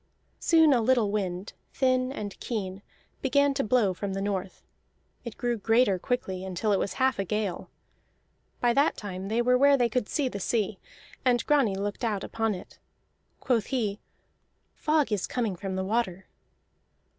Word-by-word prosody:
Soon 320 -3 +5
a 240 - +3
little 230 -3 +2
wind, 190 -2 -3 0.2
thin 255 -1 +2
and 205 -7 -6
keen, 195 -4 -4 0.4
began 280 +1 +3
to 275 - -1
blow 215 -4 +2
from 195 +1 -4
the 195 - -2
north; 195 -2 -3 0.6
it 235 -3 -8
grew 240 -1 -1
greater 225 -2 +3
quickly 190 -6 -2
until 190 +3 -1
it 195 - +2
was 200 - -2
half 260 -4 +1
a - - +2
gale. 205 -1 -3 0.9
By 240 -1 +3
that 280 +4 +2
time 190 -2 -6
they 225 +3 +1
were 250 +1 +3
where 280 0 +6
they 240 -2 +2
could 235 -1 -1
see 285 -3 0
the 200 -5 -5
sea, 210 0 -1 0.4
and 245 -2 +2
Grani 275 -10 +3
looked 205 +4 -4
out 210 -4 -1
upon 225 -2 -1
it. 180 - -12 0.6
Quoth 235 -4 +1
he: 215 -6 -1 0.7
"Fog 300 -5 +1
is 205 -3 0
coming 225 -6 -1
from 190 +1 -5
the 190 0 -2
water." 190 -3 -1
220 Hz, 170 wpm, -27 LUFS, 195-255 Hz, 0.9 s, where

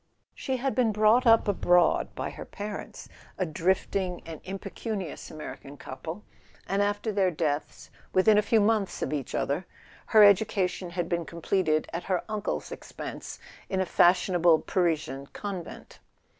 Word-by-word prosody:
She 260 -1 -3
had 270 +2 -1
been 245 -4 +2
brought 215 +4 +4
up 225 -1 +6
abroad 180 -3 +3
by - - -4
her - - -8
parents, 205 0 -7 0.3
a 185 - 0
drifting 180 +2 -1
and 165 -2 -8
impecunious 195 -1 -5
American 145 -2 -9
couple; 160 +9 -7 0.4
and 195 +1 +1
after 205 +2 0
their 195 -2 +2
deaths, 155 -3 -3 0.2
within 210 +3 +5
a 210 - +5
few 220 +1 +2
months 210 -2 +1
of - - -2
each 140 -4 -3
other, 150 +6 -1 0.4
her 215 -2 +7
education 200 -3 +3
had 175 -1 -3
been 170 -1 -1
completed, 170 -2 0
at 170 - -4
her 185 -2 0
uncle's 215 -1 -3
expense, - - -7 0.3
in 190 - -1
a 190 - +1
fashionable 175 -2 +4
Parisian 155 -6 -1
convent. 195 -5 -7
185 Hz, 145 wpm, -28 LUFS, 170-210 Hz, 0.4 s, her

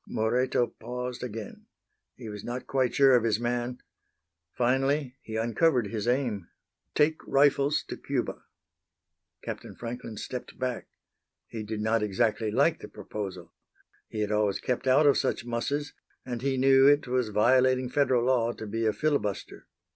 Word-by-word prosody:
Moreto 120 +3 +1
paused 125 +2 -6
again. 115 -3 -7 0.5
He 120 - -9
was 105 -1 -7
not 125 +1 -5
quite 130 -2 0
sure 135 -2 +6
of 120 - +3
his 110 -2 +1
man. 120 +1 -2 0.7
Finally 135 +2 +1
he 110 - -7
uncovered 120 +3 +2
his 110 +1 -3
aim: 120 -7 0 0.5
"Take 155 +1 +3
rifles 140 +1 +3
to - - -7
Cuba." - - -3 1.0
Captain - - -7
Franklin 115 -2 -7
stepped 125 +3 -6
back. 125 -2 -3 0.6
He 115 - -7
did 105 0 -4
not 110 +1 +1
exactly 105 +2 0
like 140 +9 +2
the - - -9
proposal. 95 -4 -7 0.6
He 110 - -4
had 105 0 -1
always 105 -2 +1
kept 125 +1 -2
out 135 +4 +5
of 140 - +5
such - - -1
musses, 140 +5 -2 0.3
and 120 -2 -4
he 135 0 0
knew 135 +1 +6
it 145 -1 +4
was 125 -2 0
violating 130 +4 +3
Federal 125 -2 +2
law 120 -2 +2
to 110 - -8
be 110 +2 -1
a 110 - +2
filibuster. 110 -5 -2
125 Hz, 155 wpm, -28 LUFS, 110-130 Hz, 1.0 s, sure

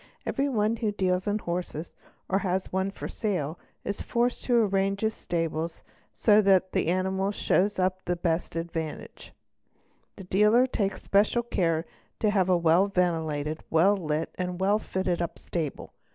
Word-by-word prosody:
Every 275 +1 0
one 220 -2 +1
who 220 -2 0
deals 185 -1 0
in 205 +1 +1
horses 175 -4 -4 0.3
or 195 - +1
has 190 -1 -2
one 190 +1 +1
for 195 - -7
sale 175 -8 -2 0.2
is 200 - -3
forced 240 +1 0
to 245 - +2
arrange 195 0 0
iis 220 0 +1
stable 165 -3 -2 0.4
so 215 -1 +4
that 190 -2 +3
the - - 0
anifnals 190 +3 0
show 190 - +3
up 185 0 +1
to - - -40
the 175 - 0
best 170 -1 -1
advantage. 165 -2 -5 0.8
The 195 - -9
dealer 210 +7 +4
akes 195 -2 -1
special 210 +4 +2
care 165 -8 0 0.3
to 215 - +2
have 190 -3 +2
a 180 - +5
well 170 +3 +4
ventilated, 160 -5 -1
well 180 +6 +4
lit, 160 -4 -2
and 180 0 -3
well 200 +3 +3
fitted 185 -4 -2
up 170 - -3
table. 160 -5 -5
185 Hz, 165 wpm, -27 LUFS, 170-205 Hz, 0.8 s, a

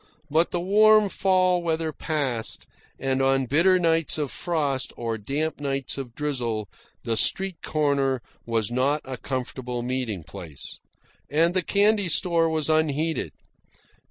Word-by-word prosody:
But 160 +3 +3
the 175 - -2
warm 210 +3 +5
fall 185 -2 +2
weather 160 -2 -1
passed, 135 -9 -2 0.3
and 135 0 -1
on 135 0 +2
bitter 170 +8 +4
nights 165 -3 +2
of 145 -4 -2
frost 145 -6 -1
or 115 -1 -2
damp 145 +8 -2
nights 135 -2 -2
of 125 -4 -7
drizzle, 120 -8 -2 0.4
the 115 -1 -1
street 190 - +1
corner 140 -4 0 0.2
was 115 -1 -1
not 135 +4 +1
a 130 -1 -5
comfortable 125 -1 -4
meeting 125 -8 -3
place. 80 -2 -9 0.5
And 165 +4 +2
the 185 - +2
candy 205 +1 +2
store 165 0 +2
was 155 -2 0
unheated. 155 0 0
145 Hz, 135 wpm, -25 LUFS, 130-165 Hz, 0.5 s, warm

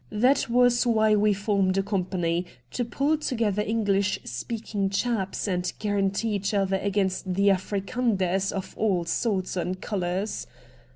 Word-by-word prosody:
That 255 - +2
was 245 0 +4
why 220 -2 +4
we 210 0 +3
formed 195 -1 +1
a 195 - +2
company, 180 -3 -1 0.2
to 245 - -1
pull 280 +6 0
together 225 -8 0
English 205 -2 +1
speaking 205 - -3
chaps, 200 -1 -1
and 180 -2 -1
guarantee 205 +1 0
each 200 +1 -1
other 195 -1 +2
against 190 -1 -1
the 200 +2 +3
Afrikanders 195 -1 0
of 190 -1 -5
all 190 -6 +1
sorts 190 -2 -1
and 185 +1 -2
colours. 190 +1 -2
200 Hz, 135 wpm, -26 LUFS, 190-220 Hz, 0.2 s, was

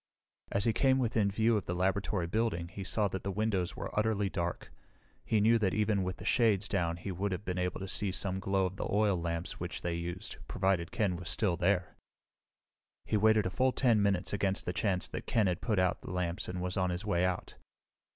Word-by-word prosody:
As 100 - +1
he 115 - +3
came 130 +2 +3
within 115 -5 +1
view 110 +3 +2
of 105 - -4
the 90 - -1
laboratory 95 0 0
building 85 -3 -1
he 95 +2 -7
saw 105 +2 +1
that 95 0 -4
the 100 - -3
windows 95 -3 -1
were - - -5
utterly 105 -2 +1
dark. 85 -3 -3 0.5
He 110 - +1
knew 115 +3 +5
that 95 -4 +1
even 105 -2 +2
with 90 -1 -3
the - - -9
shades 110 -5 +3
down 85 -4 0
he 90 +3 -5
would 95 +3 -2
have 95 +3 -4
been 90 0 -2
able 90 0 -1
to 95 - -5
see 100 0 0
some 95 0 -2
glow 95 0 +1
of 95 +1 -4
the - - -2
oil 105 -1 +3
lamps 85 0 -3
which - - -5
they 85 - -1
used, 85 +2 -5
provided 95 -3 0
Ken 100 -6 0
were 90 - -8
still 85 +2 +1
there. 90 0 0 1.1
He - - -1
waited 110 0 +4
a 90 - -1
full 130 +5 +2
10 115 -5 +3
minutes 100 -2 +1
against 100 -1 0
the 90 - -2
chance 95 -2 0
that - - -7
Ken 110 -3 +3
had 90 -2 0
put 110 -4 0
out 90 -1 +1
the - - -9
lamps 90 -1 -2
and 90 0 -4
was 90 +1 -2
on 90 -1 +1
his 90 +4 -3
way 90 -4 +1
out. 90 -1 -1
95 Hz, 225 wpm, -32 LUFS, 90-105 Hz, 1.1 s, knew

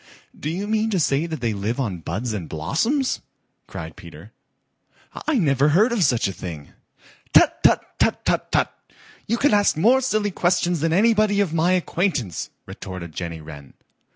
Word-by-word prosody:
"Do 150 - -5
you 185 +5 -3
mean 220 +1 +1
to 195 -4 0
say 140 +2 +1
that 160 -5 -5
they 115 -3 0
live 105 +5 -3
on 100 -10 -2
buds 110 +9 -4
and 90 -6 -5
blossoms?" 225 - 0 0.5
cried - - -8
Peter. - - -13 1.0
"I 310 -3 +2
never 140 - +3
heard 205 +11 +4
of 230 -6 +1
such 120 -8 +2
a 95 - -4
thing." 85 -5 -8 0.7
"Tut, - - +5
tut, - - +4
tut, - - +1
tut, - - 0
tut! - - +1 0.5
You 230 - +1
can 285 -1 +2
ask 205 -6 +3
more 240 +10 +4
silly 215 -5 0
questions 175 -1 +1
than 165 +2 0
anybody 210 +2 +3
of 190 -6 +1
my 170 +3 +2
acquaintance," 175 - -1 0.2
retorted 90 -4 -8
Jenny 85 -2 -5
Wren. 75 -3 -12
160 Hz, 170 wpm, -22 LUFS, -, 1.0 s, Tut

